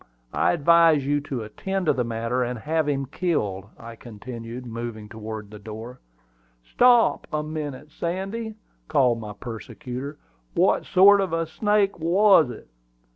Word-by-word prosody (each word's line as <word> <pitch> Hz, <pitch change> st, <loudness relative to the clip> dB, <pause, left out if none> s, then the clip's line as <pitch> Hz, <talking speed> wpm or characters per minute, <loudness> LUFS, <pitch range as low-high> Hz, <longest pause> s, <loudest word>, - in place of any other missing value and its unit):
I -, -, +2 dB
advise 165 Hz, -2 st, +5 dB
you 145 Hz, +1 st, +1 dB
to 135 Hz, -5 st, -4 dB
attend 190 Hz, -, -3 dB
to -, -, +4 dB
the 125 Hz, -, 0 dB
matter, 115 Hz, +2 st, -2 dB
and 125 Hz, 0 st, -3 dB
have 155 Hz, +5 st, -1 dB
him 135 Hz, -1 st, -1 dB
killed," 115 Hz, -, -2 dB
I 115 Hz, 0 st, -10 dB
continued, 115 Hz, +2 st, -8 dB
moving 115 Hz, -2 st, -6 dB
toward 110 Hz, -1 st, -7 dB
the 105 Hz, -, -10 dB
door. 110 Hz, +4 st, -9 dB, 0.7 s
"Stop 245 Hz, -1 st, +4 dB
a 150 Hz, 0 st, -1 dB
minute, 150 Hz, -1 st, -6 dB
Sandy," 195 Hz, +7 st, -4 dB, 0.3 s
called 130 Hz, -6 st, +3 dB
my 105 Hz, -2 st, -7 dB
persecutor. 125 Hz, +5 st, -7 dB, 0.4 s
"What -, -, +3 dB
sort 200 Hz, +2 st, +6 dB
of 185 Hz, -4 st, -2 dB
a 165 Hz, 0 st, 0 dB
snake 205 Hz, +3 st, +1 dB
was 175 Hz, -2 st, +5 dB
it?" 120 Hz, -, -10 dB
140 Hz, 145 wpm, -24 LUFS, 115-170 Hz, 0.7 s, sort